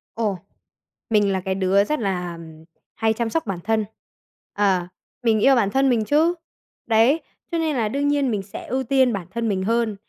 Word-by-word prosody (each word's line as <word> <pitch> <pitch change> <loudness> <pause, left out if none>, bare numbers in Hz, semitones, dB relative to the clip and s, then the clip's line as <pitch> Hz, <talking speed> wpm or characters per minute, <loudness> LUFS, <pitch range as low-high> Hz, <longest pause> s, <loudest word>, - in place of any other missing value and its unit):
Ồ, 210 -5 -1 0.7
mình 205 -2 +3
là 190 - 0
cái 190 +1 -2
đứa 195 +1 +3
rất 300 +5 -2
là, 180 -4 -2
ừm, 160 -1 -12 0.3
hay 220 -1 +1
chăm 230 0 -2
sóc 325 +1 -1
bản 190 -4 -3
thân. 220 0 +1 0.7
Ờ, 190 -3 +1 0.4
mình 220 -2 +3
yêu 270 +4 +5
bản 205 -5 +2
thân 270 0 +3
mình 225 -3 +1
chứ. 315 +6 +3 0.5
Đấy, 230 +8 +4 0.3
cho 335 - 0
nên 315 -2 0
là 225 -4 0
đương 280 +4 -1
nhiên 285 -4 +1
mình 205 -2 -1
sẽ 200 - -9
ưu 260 +2 -1
tiên 260 -1 +3
bản 185 -3 -4
thân 235 +1 -2
mình 190 -2 -1
hơn. 230 0 0
220 Hz, 200 wpm, -22 LUFS, 195-260 Hz, 0.7 s, yêu